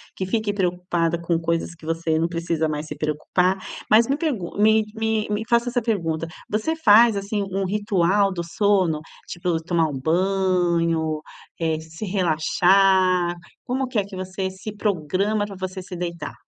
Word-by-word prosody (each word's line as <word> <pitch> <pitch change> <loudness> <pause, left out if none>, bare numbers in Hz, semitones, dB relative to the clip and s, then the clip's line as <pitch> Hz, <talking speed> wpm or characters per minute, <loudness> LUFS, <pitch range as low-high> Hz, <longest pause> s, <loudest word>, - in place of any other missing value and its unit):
que 190 - -3
fique 210 +1 -1
preocupada 175 -3 0
com 170 0 0
coisas 165 0 -1
que 160 - -15
você 165 0 0
não 165 - +1
precisa 165 -2 -1
mais 150 0 -3
se 150 - -7
preocupar, 155 +5 0 0.3
mas 225 +2 +6
me 275 - +1
pergun 260 - -3
me 215 +1 +4
me 220 -1 0
me 210 +1 -1
faço 235 +1 +3
essa 245 0 0
pergunta, 165 -8 -1 0.2
você 220 +10 -1
faz, 225 -6 +6
assim, 200 +1 -2
um 195 +1 -1
ritual 200 -1 +2
do 170 -2 -3
sono, 180 -3 +1 0.3
tipo 175 -2 -2
tomar 165 -1 +1
um 135 -3 -5
banho, 170 -2 +1 0.4
eh, 160 -2 0
se 160 +6 -8
relaxar. 185 0 +3 0.3
Como 260 +1 -1
que 250 -2 -4
é 205 - +2
que 200 -1 -10
você 185 +1 -3
se 190 +3 -8
programa 205 +2 0
para 205 -1 -9
você 185 0 -5
se 180 - -8
deitar? 170 -3 -5
185 Hz, 165 wpm, -23 LUFS, 165-205 Hz, 0.4 s, mas